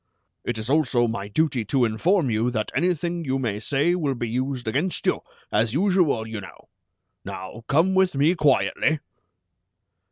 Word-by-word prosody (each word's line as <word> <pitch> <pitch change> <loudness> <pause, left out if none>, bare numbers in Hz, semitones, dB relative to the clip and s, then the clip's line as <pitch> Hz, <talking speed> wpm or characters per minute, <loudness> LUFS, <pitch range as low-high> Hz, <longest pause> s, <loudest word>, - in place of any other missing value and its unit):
It 120 - -3
is 110 0 -4
also 130 -4 +2
my 100 -3 -4
duty 135 +1 0
to 130 +3 +2
inform 140 - +1
you 110 +3 +1
that 110 -3 -2
anything 175 +2 0
you 135 -3 -1
may 115 -6 -2
say 140 +9 +1
will 150 -7 -1
be 120 -1 -3
used 125 +1 -3
against 150 +11 -1
you, - - +1 0.3
as 110 +3 +1
usual, 175 - +2
you 110 -2 -6
know! 95 - -13 0.5
Now 95 +5 -8
come 165 +7 +3
with 190 -4 +3
me 145 +5 +3
quietly!" 155 0 +2
135 Hz, 160 wpm, -24 LUFS, 115-160 Hz, 0.5 s, come